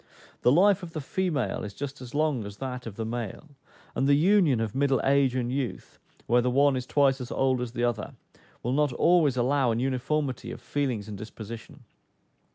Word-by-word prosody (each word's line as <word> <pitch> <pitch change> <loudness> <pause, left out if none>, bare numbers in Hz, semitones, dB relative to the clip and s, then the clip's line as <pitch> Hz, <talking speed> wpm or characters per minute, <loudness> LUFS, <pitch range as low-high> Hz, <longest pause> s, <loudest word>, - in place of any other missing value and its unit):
The 125 - +4
life 195 +6 +5
of 170 -2 -9
the 160 - -3
female 155 -1 -2
is 100 -1 -7
just 140 0 -6
as 125 +1 -9
long 150 -6 +1
as 100 0 -8
that 125 -2 -5
of 105 - -7
the 110 - -4
male; 120 +5 -5 0.4
and 135 - 0
the 140 - +6
union 165 - +4
of 110 -2 -2
middle 135 -1 +2
age 135 -2 +3
and 125 -1 -1
youth, 130 -2 -4 0.3
where 120 +1 +3
the 125 - +1
one 140 +2 +3
is 125 -1 -4
twice 135 -2 +2
as 125 - -7
old 130 -2 +1
as 120 -1 -4
the 120 - -2
other, 120 -3 -2 0.5
will 125 - -1
not 145 0 +2
always 155 -4 +3
allow 130 +1 +2
an 115 0 0
uniformity 135 +2 -1
of - - -7
feelings 120 -3 -2
and 105 -2 -7
disposition. 110 +1 -9
130 Hz, 200 wpm, -27 LUFS, 120-145 Hz, 0.5 s, the